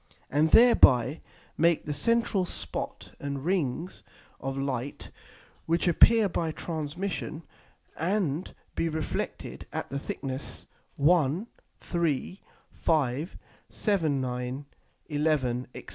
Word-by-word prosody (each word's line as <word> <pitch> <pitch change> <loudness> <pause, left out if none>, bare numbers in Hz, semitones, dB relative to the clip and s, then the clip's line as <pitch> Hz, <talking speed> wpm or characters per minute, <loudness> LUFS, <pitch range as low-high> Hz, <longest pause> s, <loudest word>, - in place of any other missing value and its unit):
and 150 +3 +3
thereby 145 - +6 0.4
make 170 0 +3
the 150 - -2
central 230 +4 +2
Spot - - -5
and 140 0 -4
Rings 170 -2 -1 0.4
of 135 0 -4
Light, 135 -1 -3 0.6
which 170 +2 +1
appear 220 +5 +6
by 170 -3 -1
transmission, 165 +2 -4 0.5
and 175 -2 0 0.2
be 165 - 0
reflected 160 -1 -4
at - - -4
the 140 - -2
thickness 135 -1 -6 0.3
1, 160 +4 +3 0.3
3, 170 +1 -1 0.3
5, 150 0 0 0.3
7, 165 - +1
9, 125 +2 -3 0.4
11, 145 -5 +1
&c. - - -8
155 Hz, 100 wpm, -28 LUFS, 135-175 Hz, 0.6 s, thereby